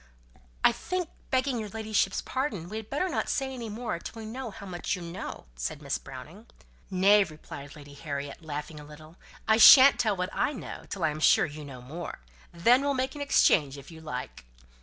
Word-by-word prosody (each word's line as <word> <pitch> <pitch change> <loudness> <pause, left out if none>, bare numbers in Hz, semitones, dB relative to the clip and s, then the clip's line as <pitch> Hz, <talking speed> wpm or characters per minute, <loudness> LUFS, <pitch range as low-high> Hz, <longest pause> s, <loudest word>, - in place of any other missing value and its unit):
"I - - +7
think, 365 -2 -3 0.2
begging 260 -1 +1
your 215 -1 -5
ladyship's 215 -2 0
pardon, 220 - -3
we 215 - -5
had 220 -1 -7
better 295 +7 0
not 350 - -2
say 270 -1 -1
any 235 -3 -6
more 215 -5 -4
till 225 - -8
we 220 - -7
know 245 +3 -5
how 200 - -10
much 180 0 -3
you 180 - -8
know," 170 +3 -7
said - - -4
Miss 140 -2 -3
Browning. 150 - -11 0.4
"Nay," 200 +2 +5
replied 150 -4 -10
Lady 145 -1 -12
Harriet, 140 0 -6
laughing 150 0 -6
a - - -10
little, 155 +3 -14 0.3
"I 220 0 +5
shan't 260 +4 +9
tell 215 -4 +2
what 180 +2 -2
I 290 - +1
know 255 - -8
till 190 - -4
I - - +3
am 150 - -6
sure - - +5
you 150 0 -8
know 130 -3 -10
more. 160 +7 -7 0.3
Then 235 +10 +4
we'll 280 0 0
make 260 +1 -1
an 290 - -7
exchange 145 - +3
if 140 +4 -12
you 160 -1 -11
like." 130 - -6
185 Hz, 205 wpm, -28 LUFS, 150-235 Hz, 0.4 s, shan't